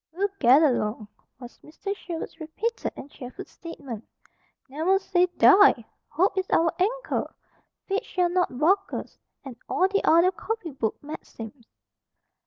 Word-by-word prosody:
"We'll 390 Hz, +5 st, -1 dB
get 265 Hz, +5 st, +6 dB
along!" 215 Hz, -6 st, 0 dB, 0.3 s
was 245 Hz, -1 st, -12 dB
Mr. 395 Hz, +6 st, -6 dB
Sherwood's 335 Hz, -3 st, -7 dB
repeated 415 Hz, +9 st, -3 dB
and 285 Hz, -, -10 dB
cheerful 250 Hz, -1 st, -9 dB
statement. 275 Hz, -10 st, -9 dB, 0.6 s
"Never 320 Hz, +8 st, +1 dB
say 365 Hz, -2 st, +2 dB
die! 370 Hz, -, +6 dB, 0.2 s
Hope 375 Hz, +5 st, +1 dB
is 375 Hz, -, -3 dB
our 330 Hz, 0 st, +3 dB
anchor! -, -, -1 dB, 0.5 s
Fate 395 Hz, +1 st, -1 dB
shall 360 Hz, -1 st, 0 dB
not 355 Hz, -8 st, 0 dB
balk 385 Hz, +7 st, +2 dB
us! -, -, -6 dB, 0.3 s
And 265 Hz, -3 st, -8 dB
all 370 Hz, -, +3 dB
the 400 Hz, +1 st, 0 dB
other 340 Hz, +3 st, +5 dB
copy 390 Hz, -2 st, -5 dB
book 230 Hz, -5 st, -2 dB
maxims." 240 Hz, -5 st, -9 dB
335 Hz, 140 wpm, -26 LUFS, 270-385 Hz, 0.6 s, get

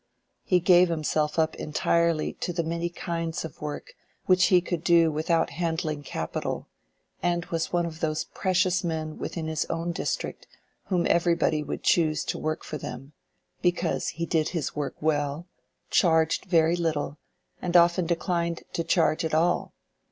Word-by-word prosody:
He 180 Hz, -, +3 dB
gave 180 Hz, 0 st, +5 dB
himself 155 Hz, -1 st, 0 dB
up 160 Hz, -1 st, +2 dB
entirely 165 Hz, +1 st, +1 dB
to -, -, -2 dB
the 170 Hz, -1 st, -1 dB
many 170 Hz, +1 st, -2 dB
kinds 165 Hz, -1 st, -3 dB
of 160 Hz, -, -10 dB
work 150 Hz, -, -6 dB, 0.3 s
which 185 Hz, 0 st, +5 dB
he 180 Hz, -, +5 dB
could 175 Hz, -2 st, -3 dB
do 170 Hz, -2 st, +5 dB
without 160 Hz, +2 st, +1 dB
handling 160 Hz, -3 st, -2 dB
capital, 80 Hz, -, -4 dB, 0.5 s
and 175 Hz, 0 st, 0 dB
was 165 Hz, -1 st, -1 dB
one 175 Hz, -1 st, +1 dB
of 160 Hz, -1 st, -7 dB
those 155 Hz, -1 st, -1 dB
precious 185 Hz, 0 st, 0 dB
men 160 Hz, -2 st, -3 dB
within 165 Hz, -2 st, -4 dB
his 160 Hz, -1 st, -1 dB
own 165 Hz, +1 st, -2 dB
district 170 Hz, -, -3 dB, 0.4 s
whom 180 Hz, -3 st, 0 dB
everybody 170 Hz, -2 st, +2 dB
would 150 Hz, -, -5 dB
choose 155 Hz, -2 st, +2 dB
to -, -, -3 dB
work 155 Hz, 0 st, -2 dB
for 150 Hz, -, -6 dB
them, 135 Hz, +4 st, -8 dB, 0.5 s
because 175 Hz, -1 st, 0 dB
he 170 Hz, -, -3 dB
did 160 Hz, -2 st, +1 dB
his 165 Hz, -6 st, -3 dB
work 145 Hz, -2 st, -3 dB
well, 150 Hz, +1 st, 0 dB, 0.5 s
charged 160 Hz, -3 st, +3 dB
very 165 Hz, -1 st, +3 dB
little, 155 Hz, -4 st, -2 dB, 0.4 s
and 180 Hz, 0 st, +3 dB
often 170 Hz, 0 st, +4 dB
declined 170 Hz, 0 st, -1 dB
to 165 Hz, -, -1 dB
charge 160 Hz, -2 st, +2 dB
at 160 Hz, -1 st, 0 dB
all. 170 Hz, +3 st, +1 dB
165 Hz, 160 wpm, -26 LUFS, 155-175 Hz, 0.5 s, gave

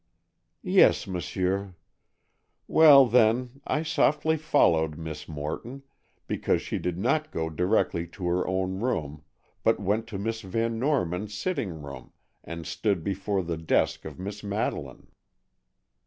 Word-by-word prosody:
"Yes, -, -, +4 dB
m'sieur. 95 Hz, +1 st, -2 dB, 0.9 s
Well, 145 Hz, -4 st, +8 dB
then, 125 Hz, +3 st, +2 dB
I 150 Hz, -, 0 dB
softly 155 Hz, 0 st, +2 dB
followed 85 Hz, -, +2 dB
Miss 80 Hz, -2 st, -7 dB
Morton, 80 Hz, -, -6 dB, 0.4 s
because -, -, 0 dB
she -, -, -3 dB
did 90 Hz, -1 st, -3 dB
not 155 Hz, +10 st, 0 dB
go 80 Hz, 0 st, -3 dB
directly 90 Hz, 0 st, 0 dB
to 90 Hz, +2 st, -8 dB
her 90 Hz, +1 st, 0 dB
own 95 Hz, 0 st, -1 dB
room, 75 Hz, -, -2 dB, 0.4 s
but -, -, +2 dB
went 110 Hz, +4 st, -1 dB
to 110 Hz, -4 st, -6 dB
Miss 110 Hz, +3 st, -3 dB
Van 115 Hz, +3 st, -2 dB
Norman's 105 Hz, -, -1 dB
sitting 105 Hz, -, -3 dB
room 70 Hz, -2 st, -10 dB, 0.3 s
and 85 Hz, -1 st, -7 dB
stood 100 Hz, -6 st, -1 dB
before 100 Hz, 0 st, -1 dB
the 85 Hz, -1 st, -3 dB
desk 80 Hz, 0 st, 0 dB
of -, -, -8 dB
Miss 100 Hz, +2 st, -6 dB
Madeleine." 100 Hz, +2 st, -3 dB
100 Hz, 130 wpm, -27 LUFS, 85-115 Hz, 0.9 s, Well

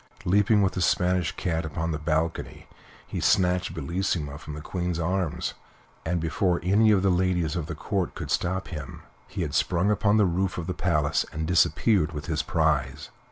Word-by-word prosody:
Leaping 105 Hz, +3 st, +4 dB
with 95 Hz, -, +1 dB
his 90 Hz, -, -1 dB
Spanish 90 Hz, -2 st, +2 dB
cat 85 Hz, -3 st, -1 dB
upon 80 Hz, +2 st, -3 dB
the 75 Hz, -, -3 dB
balcony, 80 Hz, +1 st, -2 dB, 0.4 s
he -, -, -5 dB
snatched 90 Hz, -3 st, +2 dB
Bellissima 80 Hz, -2 st, -2 dB
from 75 Hz, -3 st, -8 dB
the -, -, -6 dB
Queen's 90 Hz, +1 st, -3 dB
arms, 85 Hz, 0 st, -1 dB, 0.5 s
and 85 Hz, +1 st, -1 dB
before 85 Hz, +2 st, 0 dB
any 105 Hz, +5 st, +4 dB
of 100 Hz, -3 st, +4 dB
the 95 Hz, -, +3 dB
ladies 90 Hz, -3 st, +1 dB
of 85 Hz, -4 st, -3 dB
the 80 Hz, -, -5 dB
Court 95 Hz, +4 st, -2 dB
could -, -, -5 dB
stop 95 Hz, +2 st, -1 dB
him 75 Hz, -6 st, -7 dB, 0.2 s
he -, -, -4 dB
had -, -, -4 dB
sprung 90 Hz, +4 st, +2 dB
upon 105 Hz, 0 st, +2 dB
the 105 Hz, -, +5 dB
roof 90 Hz, +1 st, -1 dB
of 85 Hz, -, -3 dB
the 90 Hz, -, -2 dB
palace 75 Hz, -6 st, +1 dB
and 80 Hz, +1 st, -3 dB
disappeared 90 Hz, +1 st, +2 dB
with 75 Hz, -1 st, -5 dB
his 80 Hz, -2 st, -1 dB
prize. 75 Hz, -3 st, 0 dB
85 Hz, 185 wpm, -26 LUFS, 80-95 Hz, 0.5 s, the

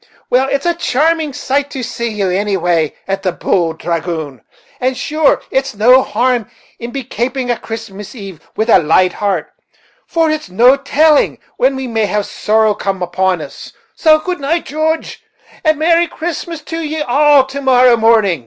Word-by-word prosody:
Well, 260 Hz, +2 st, +3 dB
it's 280 Hz, +2 st, -1 dB
a 345 Hz, -, +2 dB
charming 320 Hz, 0 st, 0 dB
sight 275 Hz, +2 st, -2 dB
to 265 Hz, -3 st, -6 dB
see 235 Hz, 0 st, -3 dB
ye, 200 Hz, -4 st, -1 dB
anyway, 175 Hz, -6 st, 0 dB
at 195 Hz, 0 st, -2 dB
the 190 Hz, -2 st, 0 dB
Bould 165 Hz, -2 st, -1 dB
Dragoon; 160 Hz, -7 st, -4 dB, 0.4 s
and 255 Hz, 0 st, -1 dB
sure 305 Hz, 0 st, +1 dB
it's 265 Hz, -4 st, -1 dB
no 250 Hz, +5 st, +5 dB
harm 245 Hz, -4 st, 0 dB, 0.3 s
to 235 Hz, -, -4 dB
be 265 Hz, +2 st, -5 dB
kaping 245 Hz, +2 st, -2 dB
a 240 Hz, -, -2 dB
Christmas 220 Hz, -1 st, -8 dB
eve 195 Hz, -7 st, -9 dB, 0.2 s
wid 220 Hz, +2 st, 0 dB
a -, -, +7 dB
light 175 Hz, +3 st, +2 dB
heart, 195 Hz, -6 st, -2 dB, 0.6 s
for 325 Hz, -2 st, +1 dB
it's 310 Hz, -6 st, -4 dB
no 240 Hz, +8 st, +5 dB
telling 295 Hz, +2 st, +2 dB, 0.2 s
when 265 Hz, +2 st, +2 dB
we 265 Hz, -1 st, -4 dB
may 225 Hz, -3 st, 0 dB
have 210 Hz, 0 st, -1 dB
sorrow 215 Hz, 0 st, +1 dB
come 195 Hz, -2 st, -3 dB
upon 180 Hz, 0 st, 0 dB
us. -, -, -10 dB, 0.2 s
So 310 Hz, -2 st, +4 dB
good 360 Hz, +2 st, -4 dB
night, 315 Hz, +5 st, -1 dB
Joodge, 315 Hz, +2 st, -2 dB, 0.4 s
and 310 Hz, -2 st, +3 dB
a -, -, -12 dB
merry 335 Hz, +2 st, +3 dB
Christmas 330 Hz, -1 st, -5 dB
to 325 Hz, +2 st, -5 dB
ye 310 Hz, 0 st, -3 dB
all 285 Hz, +1 st, +4 dB
tomorrow 260 Hz, -2 st, +3 dB
morning." 220 Hz, -7 st, +3 dB
245 Hz, 170 wpm, -15 LUFS, 195-295 Hz, 0.6 s, a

